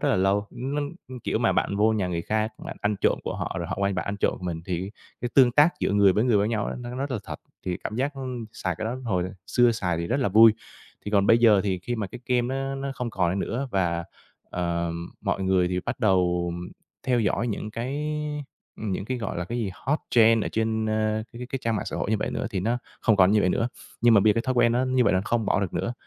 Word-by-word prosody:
rất - - +1
là - - +3
lâu. 100 +2 +2
Nó, 135 +4 -3 0.4
kiểu, - - 0
mà - - +2
bạn 100 - 0
vô 110 +2 +4
nhà 100 -4 0
người 85 -1 -2
khác, 110 +3 -1
bạn - - -6
ăn 105 -1 0
trộm - - +2
của - - -3
họ, - - -4
rồi 85 - -3
họ - - -3
qua 100 0 +1
bạn 95 - -2
ăn 100 0 -2
trộm - - 0
mình, 85 -3 -4
thì 95 +2 -3 0.3
cái 120 - -2
tương 125 -3 +6
tác 150 +4 +5
giữa - - +1
người 100 -2 +5
với 105 +5 +2
người 120 -4 +3
với 100 +2 +2
nhau 110 -3 -1
ấy, - - -4
nó 120 0 -6
rất 140 +1 -3
là 120 - -1
thật, - - -6 0.3
thì 90 - -1
cảm 110 - -4
giác 140 +2 -1
nó, 135 - -5 0.3
xài 95 -5 -2
cái 110 - -3
đó 115 +3 -2
hồi 90 -6 0 0.2
xưa 120 -1 +4
xài 90 -6 -1
thì 85 0 -2
rất - - 0
là 125 - +2
vui. 110 +2 +8 0.5
Thì 105 - -4
còn 100 -1 +3
bây 115 - +6
giờ 110 -4 +6
thì 95 -2 0
khi 120 +7 -4
mà 105 -3 -2
cái 105 - -10
game 125 -1 +2
nó 135 0 -2
nó 135 0 -4
không 125 -2 -3
còn 90 -4 +1
ấy 95 - -1
nữa 130 +7 -2
và, 85 -3 0 0.5
ờ, 85 -1 -1 0.3
mọi 95 - -1
người 95 -1 +2
thì 90 0 -1
bắt 120 - -3
đầu 90 -5 +2 0.5
theo 125 -2 +3
dõi 110 +3 0
những 105 0 -4
cái 135 +7 -3 0.7
những 100 -2 -3
cái, 130 +2 -3
gọi 110 -6 -4
là, 90 - -2
cái 120 +6 -4
gì, 105 -5 -1
hot 150 +4 -1
trend 115 -2 +5
ở - - -2
trên, 110 0 0
ơ, 110 0 0
cái 120 - -10
cái 125 - -5
cái 135 - -3
trang 115 -2 0
mạng - - -4
xã - - -4
hội - - -2
như 110 - +3
vậy - - -2
nữa - - -2
thì 95 - -2
nó 115 +5 0 0.2
không 110 -2 +3
còn 95 +1 +5
như 105 - +4
vậy 95 - +2
nữa. 115 +6 +1 0.3
Nhưng 120 -1 +6
mà 100 - +7
bây 105 +1 +5
giờ - - -11
cái 115 - 0
thói 130 -1 -1
quen 120 -1 +4
nó 125 +2 +2
như 130 -1 +2
vậy - - +3
là 95 - +2
không 115 -3 0
bỏ - - +2
được 95 - -2
nữa, 120 - -1
110 Hz, 280 wpm, -25 LUFS, 95-120 Hz, 0.7 s, vui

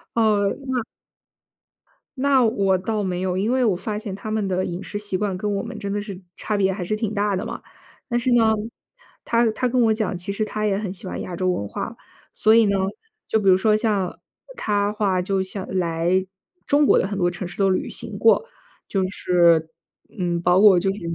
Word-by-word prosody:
呃， 210 -3 +3 0.2
那 255 -1 0 1.4
那 270 -1 +3
我 195 -4 +2
倒 210 +3 -2
没 180 -1 -2
有， 185 -1 -1
因 210 +5 0
为 260 0 +2
我 215 -6 +3
发 210 +4 -4
现 210 -2 -5
他 210 +2 -6
们 215 -2 0
的 185 0 0
饮 175 +2 -5
食 205 - -5
习 205 -2 -2
惯 195 -1 -2
跟 205 +1 -2
我 195 - -2
们 235 -1 -7
真 200 -2 -4
的 205 +1 -1
是 200 -3 -8
差 210 - -2
别 190 -1 +2
还 185 -2 -4
是 215 +5 -1
挺 215 -1 -2
大 205 -1 0
的 185 - -3
嘛。 - - -6 0.5
但 240 -2 0
是 250 +1 0
呢， 225 -2 +4 0.7
她 235 -1 +2
她 250 +4 -1
跟 250 0 +1
我 220 - +4
讲， 215 -4 -2
其 180 +3 -4
实 200 +2 -1
她 215 0 -3
也 200 -2 +1
很 205 -2 -3
喜 190 +1 -8
欢 - - -5
亚 180 - -6
洲 185 +1 0
文 100 - -1
化。 - - -5 0.4
所 220 - +4
以 230 -1 +6
呢， 200 -1 +1 0.5
就 220 - +2
比 195 -2 +3
如 185 - +7
说 215 +2 +3
像 210 -5 -1 0.4
她 205 - 0
的 210 - -2
话， 195 -4 +1
就 195 +1 0
像 190 0 -6
来 175 0 0 0.4
中 290 +1 +3
国 - - +5
的 190 - 0
很 200 - -4
多 175 -2 +2
城 175 0 -5
市 175 - -9
都 195 -1 +3
旅 185 - 0
行 - - -7
过。 - - +4 0.4
就 190 -2 0
是， 170 -4 +3 0.5
嗯， 175 -2 -1
包 180 +2 +4
括 200 -4 +7
就 195 +2 0
是 200 - -6
200 Hz, 240 characters per minute, -22 LUFS, 185-215 Hz, 1.4 s, 如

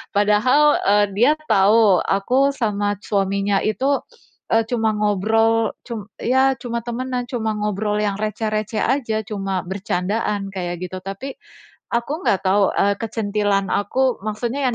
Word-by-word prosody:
Padahal, 210 +8 +4 0.2
eee, 205 +1 +4
dia 245 +7 +5 0.2
tahu, 205 -1 +5
aku 255 +8 +2
sama 205 -4 -1
suaminya 200 0 0
itu, 270 +6 +1 0.5
eee, 225 0 +3
cuma 225 -3 +1
ngobrol, 220 +2 +2 0.2
cum 220 -5 -6
ya, 265 +2 +3
cuma 235 -1 -4
temanan, 250 +1 -3
cuma 225 -4 -2
ngobrol 210 0 -1
yang 205 -2 0
receh-receh 215 0 -2
aja, 235 -5 0
cuma 195 -3 -3
bercandaan, 195 +1 -2
kayak 175 -2 -4
gitu. 185 - -6
Tapi 195 +8 -6 0.6
aku 235 +4 -1
nggak 195 - +3
tahu, 195 +1 +3
eee, 200 0 +2
kecentilan 205 -3 -1
aku 255 +5 +1
maksudnya 235 +6 -2
yang 245 - -1
215 Hz, 135 wpm, -21 LUFS, 200-235 Hz, 0.6 s, dia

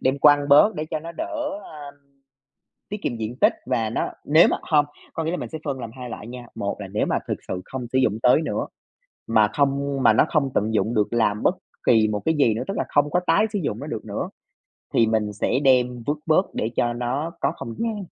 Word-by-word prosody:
đem 130 +2 +1
quăng 145 0 +5
bớt 150 +10 +6
để 155 - -3
cho 155 - -1
nó 165 +2 -8
đỡ, 320 - -4 0.4
ơ, 150 -2 -10 1.0
tiết 210 - -4
kiệm 120 - -2
diện 115 +2 -5
tích - - +5
và 115 -4 0
nó - - -1 0.2
nếu 155 +3 +6
mà - - +1
không, 150 -2 +5 0.3
có 165 - -3
nghĩa 160 - -1
là 180 - -1
mình - - -5
sẽ 160 - -6
phân 135 -3 -3
làm 115 - -6
2 125 -2 -7
loại 105 - -7
nha, 120 0 -9
1 100 +1 -3
là 100 - -6
nếu 105 +3 -1
mà - - +1
thực - - -2
sự 90 - -3
không 130 -2 -6
sử 130 - +2
dụng 110 -5 +2
tới 125 +6 +5
nữa, - - -2 0.6
mà 110 -2 +4
không 140 -1 0
mà - - +6
nó - - +4
không 145 -4 +1
tận 110 +2 0
dụng 110 +1 +1
được 105 -1 +2
làm 105 -3 +1
bất - - +3 0.3
kỳ 110 -2 +5
một 105 -1 -2
cái 160 - +2
gì 115 -6 +4
nữa, 110 - -3
tức 195 - -3
là - - +1
không 145 0 +2
có 180 - +3
tái 210 - +4
sử 205 - 0
dụng 110 -6 -2
nó 145 - -6
được 115 -8 -5
nữa - - -4 0.7
thì 115 - +4
mình 110 -2 0
sẽ 105 +5 0
đem 125 -2 +3
vứt 150 +1 0
bớt 160 +4 +2
để 110 - -1
cho 120 - +1
nó 125 +7 -2
có - - +1
không 115 - -7
gian. 220 -3 -2
130 Hz, 250 wpm, -23 LUFS, 115-150 Hz, 1.0 s, bớt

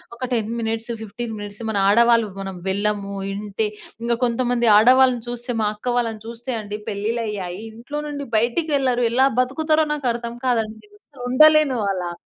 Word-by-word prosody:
ఒక 235 - -22
10 225 -2 0
minutes 225 +1 -2
15 225 +2 -6
minutes 205 +2 -8
మన 215 - -1
ఆడవాళ్ళు 230 +1 +5
మనం 195 -1 -5
వెళ్ళము. 200 0 -1 0.2
ఇంటి 210 +1 -2 0.3
ఇంగ 235 0 0
కొంతమంది 240 0 0
ఆడవాళ్ళని 250 +1 +5
చూస్తే 245 +1 -4
మా 210 - +2
అక్క 240 +4 -3
వాళ్ళని 225 -3 -1
చూస్తే 235 +3 -6
అండి 210 0 -6
పెళ్లిళ్ళయ్యాయి. 210 -3 -3
ఇంట్లో 265 +6 -6
నుండి 285 -1 -5
బయటికి 240 +9 0
వెళ్లరు. 255 -3 +1
ఎలా 260 +2 +4
బతుకుతారో 310 +5 +2
నాకర్థం 240 -4 -2
కాదండి. 225 - -1 0.4
ఉండలేను 305 -2 +5
అలా. 180 -2 -3
235 Hz, 145 wpm, -22 LUFS, 210-255 Hz, 0.4 s, ఆడవాళ్ళు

